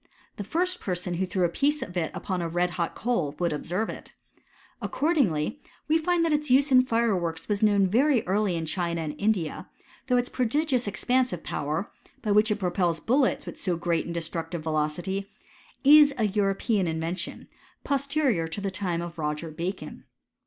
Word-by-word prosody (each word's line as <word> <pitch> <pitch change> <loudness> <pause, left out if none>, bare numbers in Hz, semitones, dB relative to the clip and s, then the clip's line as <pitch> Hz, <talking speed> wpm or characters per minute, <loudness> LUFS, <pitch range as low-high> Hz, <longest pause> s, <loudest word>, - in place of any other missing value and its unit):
The 205 - -4
first 360 - -1
person 180 -1 -3
who 185 +2 -1
threw 185 0 0
a - - +5
piece 290 - 0
of 180 - -9
it 170 -3 0
upon 185 -2 -3
a 170 - -2
red 175 +1 0
hot 170 0 -2
coal 175 -12 -1
would 175 -2 0
observe 180 +8 -2
it. - - -9 0.7
Accord* 325 +4 0
ingly 175 - +1 0.3
we 315 +2 +3
find 340 +1 +2
that 325 - +2
its 300 -1 0
use 270 +3 +4
in 255 -1 +8
fireworks 200 -10 0
was 205 -1 -1
known 205 -2 +4
very 245 +6 +3
early 195 -1 +1
in 165 -1 -2
China 170 0 -2
and 155 -2 -3
India; 200 -6 -1 0.4
though 250 - +3
its 245 0 +1
prodigious 255 0 0
ex 195 -3 -5
pansive 250 -8 +1
power, 150 +6 -3 0.3
by 210 - 0
which 210 +2 +4
it 210 - +2
propels 180 -4 0
buUets 260 - +1
with - - -7
la 180 - +2
great 170 0 0
and 170 - -5
destructive 165 0 -4
velocity, 165 +6 -2 0.5
is 290 0 +7
a 225 - +2
European 200 0 +1
inyen* 160 +2 -2
tion, 175 - -7 0.4
posterior 275 - +1
to 165 +5 -5
the 200 -1 -2
time 180 -3 -2
of 170 -1 -8
Roger 150 +1 -3
Bacon. 175 +5 -5
195 Hz, 185 wpm, -27 LUFS, 170-250 Hz, 0.7 s, in